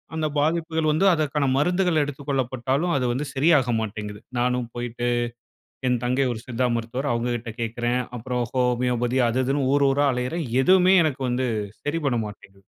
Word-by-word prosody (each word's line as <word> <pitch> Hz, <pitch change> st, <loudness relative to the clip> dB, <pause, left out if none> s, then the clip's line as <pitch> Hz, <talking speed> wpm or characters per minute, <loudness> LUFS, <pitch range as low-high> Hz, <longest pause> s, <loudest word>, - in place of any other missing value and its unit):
அந்த 155 Hz, -1 st, 0 dB
பாதிப்புகள் 160 Hz, +1 st, 0 dB
வந்து, 155 Hz, +6 st, +2 dB
அதற்கான 150 Hz, -2 st, 0 dB
மருந்துகள் 175 Hz, +1 st, +2 dB
எடுத்துக்கொள்ளப்பட்டாலும், 135 Hz, +2 st, -1 dB
அது 125 Hz, -, 0 dB
வந்து 140 Hz, +4 st, -3 dB
சரியாக 135 Hz, -4 st, +3 dB
மாட்டேன்ங்குது. 105 Hz, -1 st, -6 dB, 0.2 s
நானும் 125 Hz, 0 st, 0 dB
போய்ட்டு, 120 Hz, 0 st, -3 dB, 0.8 s
என் 125 Hz, -1 st, +1 dB
தங்கை 125 Hz, +3 st, +1 dB
ஒரு 110 Hz, -, -7 dB
சித்தா 125 Hz, 0 st, 0 dB
மருத்துவர் 120 Hz, +5 st, -3 dB
அவுங்க 120 Hz, +1 st, -1 dB
கிட்ட 120 Hz, 0 st, -6 dB
கேக்கிறேன். 120 Hz, +2 st, -1 dB, 0.2 s
அப்புறம் 125 Hz, +1 st, -2 dB
ஹோமியோபதி 125 Hz, -1 st, +1 dB
அது 125 Hz, +3 st, 0 dB
இதுன்னு 135 Hz, 0 st, 0 dB
ஊர் 140 Hz, 0 st, +3 dB
ஊரா 140 Hz, +2 st, +2 dB
அலையுறேன். 125 Hz, +7 st, -2 dB, 0.2 s
எதுவுமே 185 Hz, +3 st, +5 dB
எனக்கு 145 Hz, -3 st, -2 dB
வந்து 125 Hz, +1 st, 0 dB, 0.4 s
சரி 145 Hz, +3 st, -1 dB
பண்ண 130 Hz, -4 st, +1 dB
மாட்டேங்குது. 100 Hz, -1 st, -14 dB
130 Hz, 155 wpm, -24 LUFS, 120-145 Hz, 0.8 s, எதுவுமே